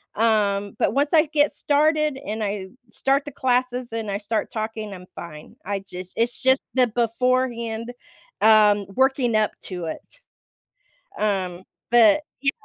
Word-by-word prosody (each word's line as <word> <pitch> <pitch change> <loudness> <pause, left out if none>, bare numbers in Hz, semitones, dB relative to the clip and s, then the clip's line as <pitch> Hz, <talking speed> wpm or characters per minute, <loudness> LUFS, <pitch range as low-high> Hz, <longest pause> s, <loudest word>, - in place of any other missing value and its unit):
um, 205 -3 +1
but - - +2
once 285 +3 +1
I 315 -1 +5
get 295 0 +2
started 305 0 +1
and 215 -1 -3
I 200 -2 -3 0.2
start 270 +4 +1
the 290 - -7
classes 250 -2 -1
and 225 -2 -3
I 200 - -1
start 215 +1 -3
talking, 220 -2 -4
I'm 180 -1 -10
fine. 155 -3 -10
I 200 +1 -2
just 185 -1 -9
it's 235 +1 -1
just 260 0 +3
the 255 -1 +4
beforehand, 235 0 -1 0.5
um, 210 -2 +5
working 265 -3 +2
up 215 -1 +2
to 180 -3 -5
it. 165 - -8 1.0
Um, 190 -4 -1 0.3
but, 235 +1 +6 0.2
yeah. 275 0 +2
225 Hz, 145 wpm, -23 LUFS, 205-260 Hz, 1.0 s, but